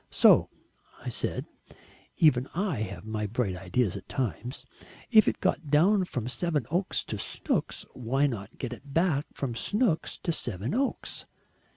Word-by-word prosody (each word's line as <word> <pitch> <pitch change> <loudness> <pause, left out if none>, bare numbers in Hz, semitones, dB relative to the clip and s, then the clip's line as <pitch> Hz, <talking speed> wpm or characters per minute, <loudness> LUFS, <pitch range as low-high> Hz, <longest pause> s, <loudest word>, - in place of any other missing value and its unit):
So - - +6 0.6
I - - -1
said - - -1 0.7
even 135 -6 +4
I 185 - 0
have 100 -3 -5
my 110 -1 -2
bright 105 -3 -1
ideas 95 +3 0
at 100 -2 -8
times 125 - -3 0.5
'if 220 -2 +7
it - - +1
got 155 - 0
down 185 +7 +4
from 125 -9 -3
Sevenoaks 160 - 0
to - - -5
Snooks, - - -2
why 130 +3 +1
not 115 -5 -3
get 125 -2 -4
it 135 +3 -11
back 165 -4 +2
from 130 -4 -2
Snooks 200 - 0
to 170 - +1
Sevenoaks?' 130 - -2
130 Hz, 145 wpm, -29 LUFS, 110-165 Hz, 0.7 s, if